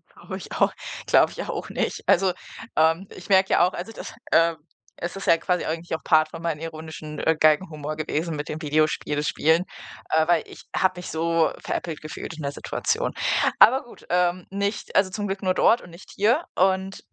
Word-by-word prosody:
Glaube - - -7
ich - - -10
auch - - +2 0.3
glaube - - +4
ich - - -5
auch - - -5
nicht. - - -2
Also, 185 0 +4 0.4
ähm, 160 +4 +3
ich 185 - -12
merke 190 -1 +4
ja 175 - +5
auch 185 - -5
also 185 +6 -6
das, - - -8 0.2
ähm 165 0 +4 0.4
es 175 +2 -4
ist 195 - -7
ja 165 - +6
quasi 180 +1 -1
eigentlich 165 +1 -3
auch 160 - -8
Part 155 0 +4
von 165 +1 -9
meinen 165 -3 -2
ironischen 160 -1 -7
äh, 160 -1 +2
Galgenhumor 155 -1 +2
gewesen 155 +1 -2
mit 150 0 -5
dem 155 - -4
Videospiele 150 0 +1
spielen. 160 +3 +2 0.5
Äh, 160 0 +3
weil 170 -2 +3
ich - - -13
habe 185 -1 +2
mich 180 - -6
so 165 0 +1
veräppelt 165 -3 -4
gefühlt 155 +1 -7
in 160 - -9
der 140 -1 -2
Situation. 450 - -2 0.5
Aber 265 +3 +7
gut, 240 - -16
ähm, 180 0 +1
nicht 200 +2 -3
also, 190 -1 +4
zum 205 +1 -3
Glück 195 +1 -4
nur 185 -1 +2
dort, 230 - +4
und 175 - -13
nicht 170 +3 -14
hier 235 - +3
und 190 +1 +1
170 Hz, 200 wpm, -24 LUFS, 155-190 Hz, 0.5 s, Aber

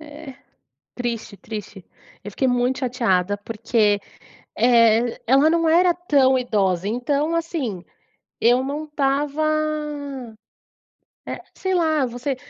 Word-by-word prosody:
É 300 -1 -11
é - - -10 0.6
triste, 235 -4 -4
triste. 195 -2 -8 0.4
Eu 205 - -6
fiquei 260 +4 0
muito 245 +2 0
chateada 205 -7 0
porque, 210 -1 0 0.6
eh, 230 0 +4
ela 275 +5 +5
não 330 -1 +2
era 350 +2 +4
tão 280 -7 +3
idosa. 200 -7 0
Então, 285 +8 -1
assim 285 - -3 0.6
eu 245 +2 +4
não 290 +3 -4
estava, 290 0 -1 1.8
eh, - - -6
sei 375 -1 -2
lá, 315 -6 +2
você 245 +3 -4
255 Hz, 115 wpm, -22 LUFS, 225-300 Hz, 1.8 s, ela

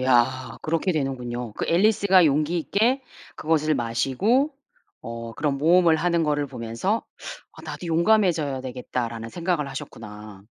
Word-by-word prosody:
야 130 -1 +2
그렇게 165 +4 0
되는군요. 125 -6 -3
그 - - -3
엘리스가 190 0 +4
용기 155 +3 +2
있게 230 - +1 0.3
그것을 155 -1 +1
마시고 140 - +1 0.5
어 115 0 -6
그런 145 +1 -1
모험을 170 +2 +5
하는 170 +1 +1
거를 145 -1 0
보면서 125 - -2 0.5
'아 - - -14
나도 180 - -7
용감해져야 165 -5 +2
되겠다.'라는 120 -3 -4
생각을 170 0 -2
하셨구나. 105 -6 -9
150 Hz, 320 characters per minute, -24 LUFS, 125-175 Hz, 0.5 s, 모험을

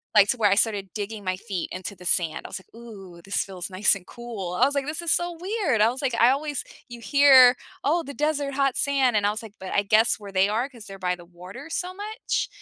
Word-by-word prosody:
like, 205 -1 +6
to 250 - +1
where 210 -3 +3
I - - +4
started 205 -2 0
digging 210 0 -5
my 185 0 0
feet 195 -4 -4
into 185 +2 -6
the 180 -1 -14
sand. 170 -2 +1
I - - -7
was - - -5
like, - - -31
"Ooh, 195 -7 -12
this 195 - -1
feels 185 -2 -6
nice 195 +2 +3
and 185 -2 -11
cool." 225 -7 -7
I 180 - +1
was 280 - 0
like, 275 -1 0
"This 305 +2 -1
is 340 - 0
so 345 -1 0
weird." 365 - 0
I 220 - +5
was 255 +4 -5
like, 260 -4 -1
I 235 +1 +5
always 290 0 -2 0.3
you 240 -1 -10
hear, 265 -2 +7 0.3
"Oh, 325 +5 +2
the 280 - -8
desert, 290 -1 -1
hot 275 -2 +1
sand." 275 -4 +2
And 205 - +1
I - - +2
was 215 +2 -6
like, 220 -2 -11
but 190 - -6
I 205 - +2
guess 215 +3 +4
where 200 -1 -10
they 190 +1 +3
are 235 +6 -1
'cause 235 -6 -13
they're 195 0 -9
by 180 0 -1
the 175 -1 -15
water 180 - -11
so 360 +2 -3
much 420 +3 -3
225 Hz, 265 wpm, -25 LUFS, 195-280 Hz, 0.3 s, hear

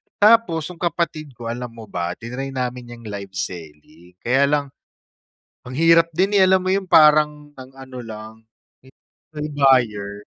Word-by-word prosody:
Tapos, 210 -7 +4
yung 170 - -14
kapatid 160 -5 -3
ko 115 0 -6
alam 125 +1 -5
mo 115 - -10
ba 85 0 -3
tinry 130 +5 -7
namin 125 -1 -5
yang 115 - -15
live 100 -3 -8
selling, 85 -1 -8
kaya 135 +3 +3
lang, 145 0 +1 1.0
ang 130 - -7
hirap 165 +2 +5
din, 190 +4 +1
eh, 190 - +6
alam 190 0 +3
mo 185 - 0
yun 195 -1 -1
parang 150 -2 +4
ang 130 0 -11
ano 130 -1 -10
lang, 110 -1 -9 0.5
eh, - - -18 0.4
joy 150 0 -4
buyer. 110 -8 +1
130 Hz, 160 wpm, -21 LUFS, 110-155 Hz, 1.0 s, eh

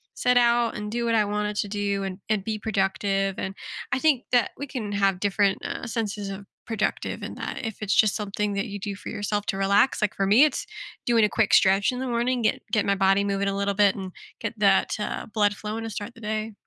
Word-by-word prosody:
sit 250 0 +2
out 235 -1 +3
and 210 0 -5
do 235 0 -1
what 230 -1 +2
I 210 -1 +3
wanted 210 0 -2
to 205 - 0
do 200 -1 -1
and, 190 0 -5
and 210 -3 +1
be 215 0 -3
productive 195 -2 0
and 190 +1 -4 0.4
I - - +2
think 280 -3 +2
that 245 -3 +3
we 285 - -5
can 225 -6 -5
have 195 -2 +1
different, 200 0 +1
uh, - - -4
senses 210 -3 -3
of 195 +1 -7 0.2
productive 220 -2 -2
in - - -5
that - - -5
if 220 -1 -6
it's, 205 -1 0
just, 215 -2 +4
something 205 0 -2
that 200 +3 -1
you 205 0 -6
do 200 0 -4
for - - -8
yourself 205 0 -2
to 195 - -1
relax, 200 +6 +3
like, 210 - 0
for 195 - 0
me, 225 +8 +7
it's 300 - -2 0.4
doing 230 -2 +4
a 210 - +4
quick 220 -2 +1
stretch 195 +4 +5
in 250 - -5
the 260 - -3
morning, 240 +1 0
get 215 - +1
get 215 -3 +2
my 200 - +2
body 195 +1 +3
moving 200 0 0
a 195 - -2
little 200 0 0
bit 200 -1 +4
and 190 -2 -6 0.3
get 225 0 -3
that, 195 -2 +3
uh, 210 - -3
blood 205 -2 +2
flowing 215 +2 -5
to 225 - -4
start 210 +3 -6
the 230 - -15
day. 215 0 -3
210 Hz, 240 wpm, -25 LUFS, 200-225 Hz, 0.4 s, me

